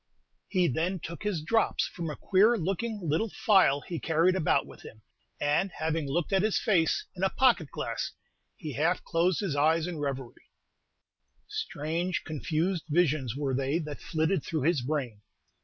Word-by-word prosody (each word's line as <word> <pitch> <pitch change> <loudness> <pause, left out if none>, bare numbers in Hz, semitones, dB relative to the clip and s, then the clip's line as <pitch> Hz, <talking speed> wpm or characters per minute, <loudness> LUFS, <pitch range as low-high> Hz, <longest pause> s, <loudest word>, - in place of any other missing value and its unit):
He 185 -3 +2
then 170 +7 0
took 165 +1 -7
his 200 -7 -2
"drops" 225 +7 +2
from 170 -2 -5
a 150 - -4
queer 210 +5 +3
looking 200 +4 -2
little 160 +10 +1
phial 185 - +3
he 170 +1 -5
carried 165 +3 +2
about 175 -5 +2
with - - -14
him, 110 -1 -13 0.4
and 150 +7 +1
having 160 -1 -2
looked 170 +6 -1
at 190 - +4
his 215 0 +1
face 180 -8 +2
in 180 - -7
a 190 - +4
pocket 235 - +3
glass, - - -3 0.5
he 150 -3 -6
half 160 +6 +1
closed 175 +2 +1
his 185 -8 -2
eyes 160 +3 +3
in 175 -3 -5
revery. 135 -4 -5 1.0
Strange, 165 +4 -2
confused 160 +3 -2
visions 150 -7 +1
were 140 -2 -1
they 135 +4 0
that 150 -3 -6
flitted 160 +3 0
through 155 -5 -2
his 160 -2 +2
brain. 125 -6 -3
165 Hz, 165 wpm, -29 LUFS, 150-185 Hz, 1.0 s, at